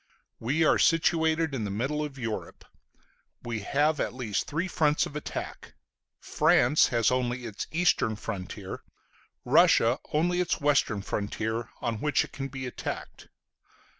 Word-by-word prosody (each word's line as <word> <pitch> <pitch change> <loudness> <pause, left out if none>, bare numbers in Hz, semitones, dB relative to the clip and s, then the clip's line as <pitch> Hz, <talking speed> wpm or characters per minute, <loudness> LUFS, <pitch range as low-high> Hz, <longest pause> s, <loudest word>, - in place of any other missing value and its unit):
We 140 +8 +1
are - - +4
situated 160 -1 +2
in 125 -5 -2
the 105 - -3
middle 135 +9 -1
of 145 -2 -6
Europe. 115 -4 -5 0.8
We 115 -2 -3
have 145 +8 +1
at - - -2
least 115 -6 -2
three 165 +5 -2
fronts 150 -4 +2
of 145 - -9
attack. 150 - -6 0.4
France 140 +5 +3
has 115 -2 +2
only 125 -1 -1
its 110 -3 -5
eastern 160 -10 +2
frontier, 100 -4 -6 0.6
Russia 120 +4 +5
only 175 +4 +1
its 180 - -1
western 140 -8 +1
frontier, 110 +3 -3
on 115 -1 -2
which 150 0 +2
it - - -10
can 135 0 -5
be 135 -1 -6
attacked. 125 - -6
135 Hz, 140 wpm, -28 LUFS, 115-150 Hz, 0.8 s, Russia